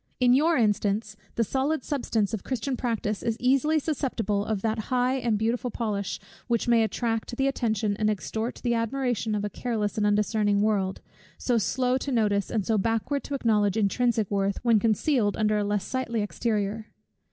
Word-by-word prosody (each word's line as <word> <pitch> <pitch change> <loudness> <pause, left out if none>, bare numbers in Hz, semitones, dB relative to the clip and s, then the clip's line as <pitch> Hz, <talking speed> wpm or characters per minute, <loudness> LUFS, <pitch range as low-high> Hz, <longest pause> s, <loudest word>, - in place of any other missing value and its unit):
In 250 -1 +5
your 315 +5 +4
instance, 210 -1 +1 0.2
the 230 - +2
solid 270 +5 -1
substance 230 -7 -1
of 215 - -3
Christian 260 +1 -2
practice 225 -4 -2
is 230 -1 -1
easily 275 +5 +3
susceptible 255 -9 -1
of 210 -2 -2
that 220 0 0
high 255 +1 +2
and 235 -4 0
beautiful 230 +3 -1
polish, 210 -4 -3 0.3
which 235 -2 0
may 235 -1 +5
attract 225 +1 -1
the 270 - +1
attention, 220 -6 0
and 215 0 +1
extort 220 +3 -3
the 240 -1 +1
admiration 230 -1 -1
of 205 0 -1
a - - -2
careless 220 -3 -2
and 210 - +2
undiscerning 205 0 +2
world, 195 -3 0 0.4
so 240 -2 +1
slow 250 +7 +1
to 275 - -4
notice, 205 -5 +1
and 215 -4 -1
so 220 -2 +2
backward 225 +7 -1
to 285 - -3
acknowledge, 210 -5 +2
intrinsic 220 0 +1
worth, 200 -1 0
when 230 -3 +4
concealed 225 0 +1
under 215 -1 +2
a - - 0
less 205 -1 0
sightly 235 -4 -2
exterior. 215 0 -2
225 Hz, 175 wpm, -26 LUFS, 210-250 Hz, 0.4 s, In